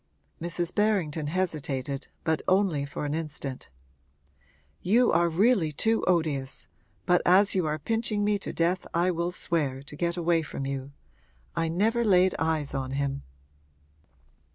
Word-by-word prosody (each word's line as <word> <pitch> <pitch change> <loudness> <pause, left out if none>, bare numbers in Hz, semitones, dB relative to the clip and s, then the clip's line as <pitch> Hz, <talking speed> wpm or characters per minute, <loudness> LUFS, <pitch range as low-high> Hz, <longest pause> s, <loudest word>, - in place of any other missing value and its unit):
Mrs. 170 +1 -2
Berrington 175 -8 +1
hesitated, 145 -6 -2 0.2
but 160 -1 0
only 185 -7 +2
for 140 +2 -5
an 145 - -2
instant. 150 -4 -5 1.1
'You 235 +6 +3
are 170 +1 +3
really 185 -1 +3
too 220 +9 +1
odious, 155 -7 0 0.4
but 180 -1 +4
as 195 +3 +5
you 185 -4 +1
are 155 0 -1
pinching 220 +4 -1
me 205 0 +1
to - - -5
death 175 +2 0
I 175 +2 +3
will 170 0 -1
swear, 145 -7 -1
to 145 - -10
get 170 +2 -1
away 170 -1 +2
from 145 -3 -5
you. 135 0 -4 0.6
I 165 0 0
never 220 +8 +1
laid 185 -3 +4
eyes 160 -3 -1
on 135 -1 -3
him.' 140 0 -2
170 Hz, 145 wpm, -27 LUFS, 145-185 Hz, 1.1 s, as